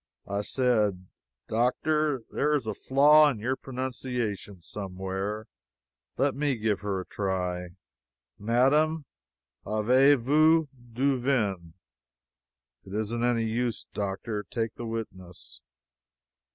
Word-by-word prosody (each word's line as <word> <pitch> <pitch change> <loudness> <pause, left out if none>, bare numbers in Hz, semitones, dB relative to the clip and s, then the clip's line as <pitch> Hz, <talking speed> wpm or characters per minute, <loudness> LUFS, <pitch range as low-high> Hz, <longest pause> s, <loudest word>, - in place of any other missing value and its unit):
I 100 0 -1
said: 105 -6 +1 0.4
"Doctor, 135 +4 +1
there 150 +1 +1
is 135 -6 -1
a 110 - -2
flaw 150 +6 +5
in 130 - -3
your 125 +5 -1
pronunciation 125 -8 -4
somewhere. 95 +2 -4 0.7
Let 140 0 +2
me 140 -2 0
try 100 -2 -2
her. 90 -2 -2 0.7
Madame, 140 +8 +2 0.6
avez 130 +7 +4
vous 155 +5 +4 0.2
du 130 +3 +1
vin? 100 -11 -1 1.1
It 95 +1 -8
isn't 110 +2 -2
any 120 -2 +2
use, 115 +1 -2
Doctor 105 +1 -3
take 115 -2 -2
the 120 - -7
witness." 95 -6 -8
115 Hz, 100 wpm, -28 LUFS, 100-135 Hz, 1.1 s, flaw